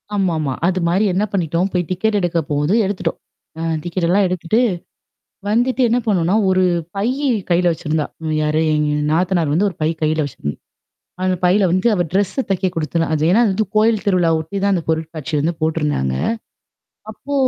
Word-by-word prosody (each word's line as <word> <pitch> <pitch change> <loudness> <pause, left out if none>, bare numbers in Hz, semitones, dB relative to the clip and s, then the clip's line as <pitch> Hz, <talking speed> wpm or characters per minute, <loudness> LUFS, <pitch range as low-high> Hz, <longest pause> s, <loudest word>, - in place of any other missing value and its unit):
ஆமாமா. 160 -8 0
அது 185 0 0
மாரி 195 +5 +2
என்ன 195 +3 +1
பண்ணிட்டோம் 175 0 0
போய் 180 - +1
டிக்கெட் 205 +4 0
எடுக்க 175 -2 0
போகுது 145 +6 +1
எடுத்துட்டோம். 200 -1 -2 0.4
ஆ - - -3 0.2
டிக்கட்டெல்லாம் 180 +3 +1
எடுத்துட்டு, 180 +4 0 0.9
வந்துட்டு 245 +5 +1
என்ன 240 - +2
பண்ணோம்ன்னா 190 -3 +2
ஒரு 185 0 +3 0.3
பையி 255 +8 0 0.2
கையில 175 0 +3
வச்சிருந்தா, 155 -1 -2 0.2
ம் 155 -1 -1
யாரு? 155 +1 +1
எங்க 150 0 +1 0.2
நாத்தனார் 170 -2 +1
வந்து 200 +6 +2
ஒரு 180 - -12
பை 155 - +2
கையில 155 0 +1
வச்சிருந்தா. 75 - -5 0.7
அந்த 185 0 +1
பையில 195 +3 +4
வந்து 185 +5 +2
அவ 180 -4 +1
ட்ரெஸ்ஸ 205 +7 0
தைக்க 185 0 +1
குடுத்துருந்தா. 165 +1 -1
அது 150 - -1
ஏன்னா, 225 - +4
அது 215 - +2
வந்து 215 +3 0
கோயில் 220 -1 +3
திருவிழாவ 175 -5 +2
ஒட்டி 160 +6 -6
தான் 200 - +3
அந்த 175 -3 -1
பொருட்காட்சி 160 -1 -3
வந்து 165 +4 0
போட்டுருந்தாங்க. 150 - 0 1.0
அப்போ 280 +6 -8
180 Hz, 170 wpm, -19 LUFS, 160-200 Hz, 1.0 s, பையில